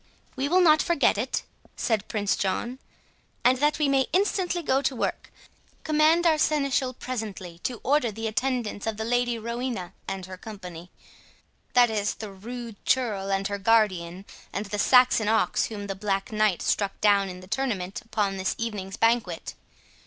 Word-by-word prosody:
"We 270 +1 -1
will 365 +3 +4
not 310 -3 +6
forget 310 -10 +2
it," 235 +6 -2 0.3
said 220 -3 -1
Prince 205 -2 0
John; 235 +6 -2 0.6
"and 250 +1 +4
that 295 +1 +2
we 300 -1 +2
may 270 -1 +2
instantly 365 -2 +1
go 270 -2 +2
to 275 - 0
work, - - -3 0.5
command 310 +3 +3
our 315 -2 +4
seneschal 275 -4 +1
presently 210 -10 -6
to 245 +5 -4
order 275 -4 +2
the 225 +2 -6
attendance 225 -2 -2
of 220 -1 -2
the 220 - -3
Lady 245 0 +1
Rowena 235 -5 -4
and 190 -1 -4
her 185 0 -9
company—that 195 +5 -4
is, 210 -1 -1
the 215 -2 -7
rude 230 +2 -8
churl 210 -7 0
her 195 +1 -1
guardian, 195 -4 +2 0.3
and 200 - -3
the 210 +1 -4
Saxon 250 -2 +5
ox 220 +1 +2
whom 205 -2 -6
the 195 - -3
Black 195 0 -2
Knight 215 -4 +1
struck 200 -2 0
down 200 -2 +3
in 180 0 -8
the - - -11
tournament, 215 -3 -2
upon 210 -4 -1
this 190 0 -1
evening's 205 -4 -4
banquet. 225 -7 +1
220 Hz, 160 wpm, -26 LUFS, 195-255 Hz, 0.6 s, not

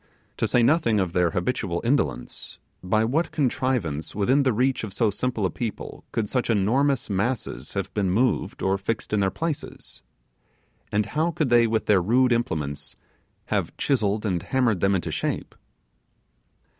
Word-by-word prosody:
To - - +1
say 120 - +3
nothing 120 -5 +3
of 90 -3 -1
their 90 -2 +3
habitual 90 -1 -1
indolence, 135 +5 -1 0.2
by 110 +4 +1
what 150 +9 0
contrivance 125 - -1
within 125 +8 +3
the 135 -2 +3
reach 125 +3 +1
of 105 -3 -5
so 105 +1 +2
simple 115 -1 -1
a 90 - 0
people 115 +1 -5
could 110 -2 -1
such 125 +2 -1
enormous 120 +6 +2
masses 100 - -2
have 100 -1 -3
been 100 -3 0
moved 120 +7 0
or 95 +1 +1
fixed 110 +2 -3
in 105 - +3
their 95 -1 +2
places? 150 - -5 0.9
and 105 0 +1
how 160 +3 0
could 155 -5 -1
they 120 -1 +5
with 110 0 0
their 100 -3 +4
rude 125 +7 +3
implements 75 -11 -2 0.6
have - - -1
chiselled 110 -5 0
and 90 -5 0
hammered 120 -5 +1
them 95 +2 +3
into 90 - -2
shape? - - -3
110 Hz, 160 wpm, -25 LUFS, 95-130 Hz, 0.9 s, they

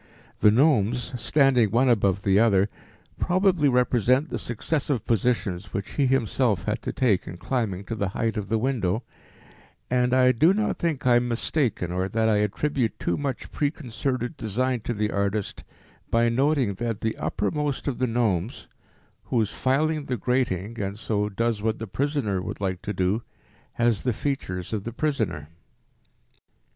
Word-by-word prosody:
The 105 - +6
gnomes 125 -1 +2
standing 135 -7 +3
one 120 +6 +3
above 100 -5 +2
the 100 0 +4
other 100 -3 +4 0.5
probably 180 -5 +3
represent 125 +3 +2
the - - -2
successive 130 +1 -1
positions 100 -4 0
which 100 - -4
he 140 -3 +1
himself 125 -5 +1
had - - -2
to - - -3
take 110 -8 +1
in 85 - -7
climbing 100 -1 -2
to 115 - -5
the 100 -3 -1
height 115 +4 -2
of 105 -3 -4
the 115 - +2
window, 115 -4 0 0.9
and 125 -1 +2
I 130 0 +5
do 160 +10 +4
not 215 0 -1
think 165 -7 -1
I 120 -1 +6
am 120 0 0
mistaken 120 - -1
or 95 +1 -1
that 110 +2 +1
I 110 -2 +3
attribute 115 +4 0
too 85 - -1
much 140 -3 -4
preconcerted 130 -2 -2
design 125 +4 -1
to 120 - -2
the 105 0 -1
artist, 100 +1 -2 0.5
by 115 0 +3
noting 130 -2 +2
that 115 +2 -3
the 110 -1 -1
uppermost 140 +10 -2
of 140 - -2
the 130 - +1
gnomes, 115 -3 -1 0.6
who 125 - 0
is 105 -2 0
filing 150 +5 0
the 125 -2 -2
grating 115 -3 -1
(and 100 +1 -3
so 105 -1 -1
does 115 +1 -1
what 110 0 0
the 110 - -5
prisoner 115 -3 -1
would - - -6
like 95 -2 -2
to 105 - -4
do) 95 +4 0 0.5
has 115 -3 +1
the 125 - 0
features 100 -9 -3
of 105 -3 -2
the 115 - -5
prisoner. 135 - -2
115 Hz, 165 wpm, -25 LUFS, 100-130 Hz, 0.9 s, The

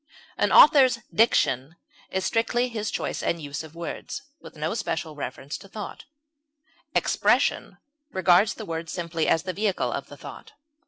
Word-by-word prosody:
An - - +1
author's 275 -5 +7 0.2
diction 160 - +2 0.3
is 190 0 -2
strictly 240 +3 +1
his 215 -2 -3
choice - - -3
and 170 - -1
use 145 -1 -5
of 160 0 -13
words, 170 -1 -6 0.2
with - - -13
no 155 +4 -2
special 165 -8 -3
reference 145 -1 -6
to 195 - -13
thought; 210 +1 -8 0.9
expression - - +2 0.3
regards 190 +3 +4
the 220 - -7
words 165 -1 -5
simply 170 -2 -2
as 165 - +3
the 185 -1 -3
vehicle 205 -1 0
of - - -4
the - - -12
thought. - - -11
180 Hz, 155 wpm, -25 LUFS, 160-220 Hz, 0.9 s, author's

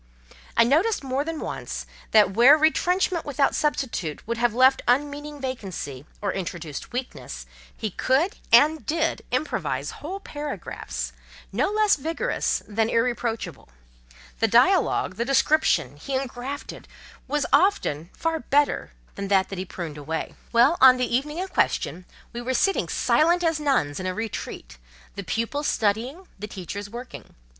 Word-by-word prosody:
I 230 - +7
noticed 320 - +2
more 265 +1 -1
than 325 0 -4
once, - - -5 0.2
that 210 -3 +5
where 250 +8 +7
retrenchment 345 +2 +2
without 285 -1 +1
substitute 240 - -2
would 235 0 -2
have 240 -2 +2
left 260 +2 +5
unmeaning 290 +3 0
vacancy, 185 - -5 0.2
or 200 - 0
introduced 170 -5 -5
weakness, 250 +1 -6 0.3
he 215 -3 -3
could, 275 - +1
and 300 +7 +6
did, 325 +1 0
improvise 255 +5 -2
whole 370 +7 -5
paragraphs, 210 - -5 0.4
no 255 - +1
less 425 -2 +3
vigorous 320 +4 -1
than 220 +1 0
irreproachable; 230 - -1 0.7
the - - +3
dialogue—the 200 +6 +3
description—he 270 - +1
engrafted 265 +2 -5 0.4
was 290 +1 0
often 280 - +2
far 325 -1 -1
better 290 - +1 0.2
than 200 - -5
that 195 -1 +2
he 190 -1 -4
pruned 165 -5 -7
away. 160 +3 -4 0.2
Well, 240 +8 +4
on 255 -1 +9
the 250 -1 0
evening 295 +5 -1
in 370 +2 -2
question, 185 - 0 0.3
we 240 - -4
were 255 +2 -2
sitting 390 +7 +1
silent 345 +3 +3
as 325 -2 +1
nuns 265 - +1
in 185 - -3
a 185 - -2
"retreat," 215 - -6 0.3
the 200 - -6
pupils 230 - -2
studying, 240 - -1
the 210 - -5
teachers 200 +1 -7
working. 240 +3 -9
255 Hz, 140 wpm, -25 LUFS, 200-300 Hz, 0.7 s, on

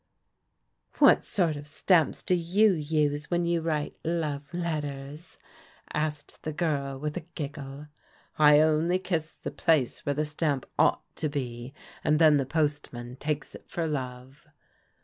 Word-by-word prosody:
"What - - +6
sort 170 -6 +1
of 145 0 -8
stamps 165 +1 +2
do 185 - +1
you 185 +5 +4
use 150 -3 0
when 175 -1 +1
you 170 -1 +1
write 155 -2 -2
* - - -44 0.2
love 145 -1 -4
letters 150 -2 -4 0.2
'? - - -24
" - - -32
asked 150 -1 -3
the 155 - -3
girl 145 -4 -1
with 150 +4 -4
a 165 -2 -6
giggle. 145 -1 -6 0.3
" - - -31
I 150 0 +7
only 160 +3 +3
kiss 165 -4 -3
the - - -6
place 155 -7 +1
where 145 - -1
the 150 +1 0
stamp 150 -3 -1
ought - - +4
to 155 - -1
be, 125 -2 -5 0.3
and 150 - +3
then 155 -2 +6
the 135 -2 -1
postman 145 -5 -2
takes 150 +1 -3
it - - -13
for 170 - -2
love." 130 -2 -5
150 Hz, 165 wpm, -28 LUFS, 145-160 Hz, 0.3 s, I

